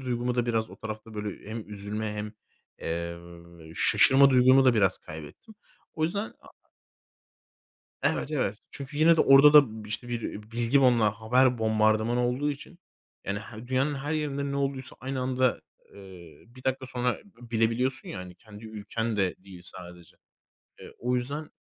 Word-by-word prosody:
duygumu 125 -1 -2
da 120 -1 0
biraz 115 -1 -1
o - - -12
tarafta, 110 0 -8
böyle, 105 0 -6
hem 110 -1 -6
üzülme 105 +1 -4
hem, 105 0 -5 0.5
eee, 85 0 -7
şaşırma 135 +9 +5
duygumu 130 +1 +6
da 125 -2 +5
biraz 95 -4 +2
kaybettim. 80 - -11 0.4
O 155 - -3
yüzden, 200 +7 -1
aaa - - -21 1.4
Evet, 150 - 0
evet. 110 -8 -1
Çünkü 140 +1 -8
yine 165 +1 +6
de - - +3
orada 140 +2 +7
da 110 -8 +5
bir, 105 - -11
işte, 120 +3 -5
bir 115 -3 -4
bilgi 120 +4 +2
bomba 120 -5 +4
haber 125 +2 +3
bombardımanı 110 +2 +2
olduğu 135 +4 -1
için, 155 +5 -9 0.5
yani, 100 +1 -2
he 110 +2 -10
dünyanın 135 +3 +1
her 140 +3 -4
yerinde 140 -2 -2
ne - - -2
olduysa 135 -2 -3
aynı 130 +1 -4
anda, 130 0 +1 0.3
eee, 90 -6 -14
1 125 +2 -17
dakika 130 0 -1
sonra 125 -1 -1 0.2
b 120 - -13
bilebiliyorsun 115 +3 +2
ya - - -6
hani. 90 -1 -9
Kendi 110 +2 -14
ülken 110 +1 -4
de 95 -2 +1
değil 95 -2 -12
sadece. 90 -1 -7 0.6
Eee, - - -11
o 125 +1 0
yüzden 140 +5 -4
120 Hz, 165 wpm, -27 LUFS, 105-130 Hz, 1.4 s, orada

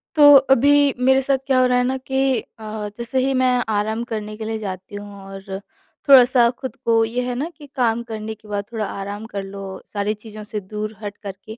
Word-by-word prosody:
तो 290 -1 +9 0.2
अभी 285 +2 +4
मेरे 265 +1 +4
साथ 270 0 +1
क्या 265 -2 +3
हो 255 - +5
रहा 250 0 +3
है 250 - +3
ना 260 +1 0
कि 265 -1 0 0.2
अ, 215 -1 -5
जैसे 235 +2 -2
ही 270 - +1
मैं 255 -1 +3
आराम 220 +2 0
करने 215 -1 -4
के 220 - -6
लिए 220 0 -2
जाती 190 -1 -7
हूँ 205 -1 -9
और 195 0 -7 0.5
थोड़ा-सा 250 -2 +7
खुद 250 0 -7
को 230 -1 +4
ये 235 +3 -2
है 250 - -2
ना 290 +7 -2
कि 295 - -12
काम 235 -3 +1
करने 220 0 -5
के 215 0 -20
बाद 205 -1 -3
थोड़ा 220 -2 -1
आराम 200 +2 -6
कर 200 -1 -4
लो 195 0 -8 0.3
सारी 205 +1 0
चीज़ों 215 0 -10
से 210 0 -5
दूर 210 +2 -6
हटकर 205 -1 -6
के। 220 +1 -9
220 Hz, 220 wpm, -21 LUFS, 210-255 Hz, 0.5 s, तो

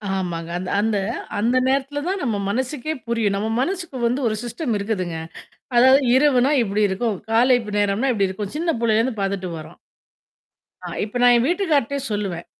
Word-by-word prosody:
ஆமாங்க. 170 -3 -3
அந்த 185 0 -5
அந்த 215 -1 +1 0.4
அந்த 240 +4 +2
நேரத்தல 275 +2 0
தான் 385 0 -1
நம்ம 225 -5 0
மனசுக்கே 260 +6 -2
புரியும். 225 -4 0
நம்ம 220 +2 -2
மனசுக்கு 345 -4 -3
வந்து 255 +4 -1
ஒரு 215 - 0
சிஸ்டம் 240 +1 -3
இருக்குதுங்க. 185 -5 -3 0.6
அதாவது 260 +3 +6
இரவுனா 270 -1 +4
இப்படி 210 0 0
இருக்கும். 205 +2 -1
காலைப் 240 -1 +3
நேரம்னா 205 +6 +1
இப்படி 200 -4 +1
இருக்கும். 195 +1 -5
சின்ன 330 +1 0
புள்ளையிலேருந்து 225 0 +1
பார்த்துட்டு 195 -2 -2
வர்றோம். 155 +3 -12 1.1
ஆ, - - -4 0.2
இப்ப 220 +4 -4
நான் 245 0 +6
என் 235 +1 +3
வீட்டுக்கார்ட்டயே 300 - +1
சொல்லுவேன். 195 -5 -3
230 Hz, 155 wpm, -22 LUFS, 200-265 Hz, 1.1 s, அதாவது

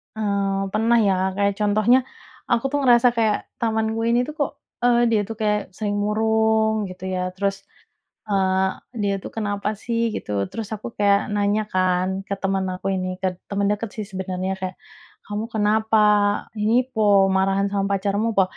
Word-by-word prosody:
Eee, 200 -2 0
pernah, 225 +3 +2
ya, 195 - +3 0.2
kayak 200 0 +1
contohnya, 215 +4 +4 0.5
aku, 235 -1 +1
tuh, 290 - +1
ngerasa 245 -1 +5
kayak 220 -2 +3 0.2
temanku 220 -1 0
ini, 240 +1 +3
tuh, 305 - -4
kok, 285 - 0 0.3
eee, 240 -1 +4
dia 215 - +3
itu 225 - -4
kayak 210 -1 +2 0.2
sering 205 -1 -2
murung, 220 0 +1
gitu, 185 0 -11
ya, 185 - -1 0.2
terus, 195 0 -2 0.6
eee, 190 -1 +2 0.3
dia, 200 -1 +1
tuh, 190 - -9
kenapa, 205 -1 -2
sih, 230 +1 -2
gitu, 100 -1 -2
terus 225 -3 -5
aku 215 +2 -8
kayak 200 0 +2
nanya, 205 +1 +1
kan, 185 +1 +1
ke 200 - -2
teman 195 0 -1
aku 195 +1 -2
ini, 185 -1 -3
ke 185 -1 -2
teman 200 0 0
dekat, 215 +2 -4
sih, 215 - -3
sebenarnya, 185 0 -3
kayak, 185 -1 -4 0.5
"Kamu 210 +2 -3
kenapa, 220 0 +1 0.6
ini 235 +4 +3
po? 220 - -1 0.3
Marahan 195 +1 +2
sama 195 -1 0
pacarmu 205 +3 0
po?" 190 - +7
205 Hz, 165 wpm, -22 LUFS, 195-220 Hz, 0.6 s, po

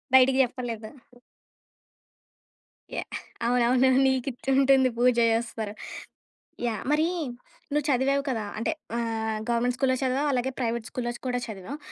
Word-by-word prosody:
బయటికి 260 0 +6
చెప్పలేదు. 235 -3 -4 2.1
యాహ్! - - -4 0.4
అవునవును. 250 +2 +4 0.2
నీకిచుంటుంది 265 +1 +3
పూజ 250 +1 +5 0.2
చేస్తారు. 225 -2 -2 0.9
యాహ్! 220 -4 -2
మరి 310 +2 +3 0.7
నువ్వు 295 -1 +1
చదివావు 275 +1 +2
కదా! 230 -5 -1
అంటే 225 +9 0 0.2
ఆహ్, 225 -2 -1
గవర్నమెంట్ 240 +1 +1
స్కూల్‌లో‌ 260 0 +2
చదివావు, 270 +3 +1
అలాగే 260 0 0
ప్రైవేట్ 235 -2 -1
స్కూల్‌లో 245 -3 -3 0.2
కూడా 245 0 0
చదివావు. 220 +5 -7
250 Hz, 110 wpm, -27 LUFS, 230-265 Hz, 2.1 s, బయటికి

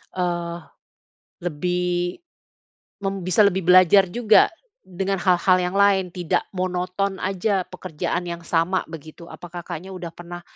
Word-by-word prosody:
eee, 175 -2 -2 0.8
lebih 175 +1 -2 0.8
mem 195 -1 -3
bisa 185 +4 +3
lebih 190 -1 -1
belajar 185 +1 +6
juga 220 0 +4 0.3
dengan 195 +1 -3
hal-hal 185 0 +3
yang 180 +2 -2
lain 195 -2 +3
tidak 175 -2 -1 0.2
monoton 185 +2 -2
aja 195 +1 0
pekerjaan 175 0 -4
yang 170 -1 -5
sama 170 +2 0
begitu. 160 +1 -11
Apa - - -10 0.2
Kakaknya 175 +2 -7
udah 180 -2 -6
pernah 175 +1 -10
180 Hz, 125 wpm, -23 LUFS, 175-190 Hz, 0.8 s, belajar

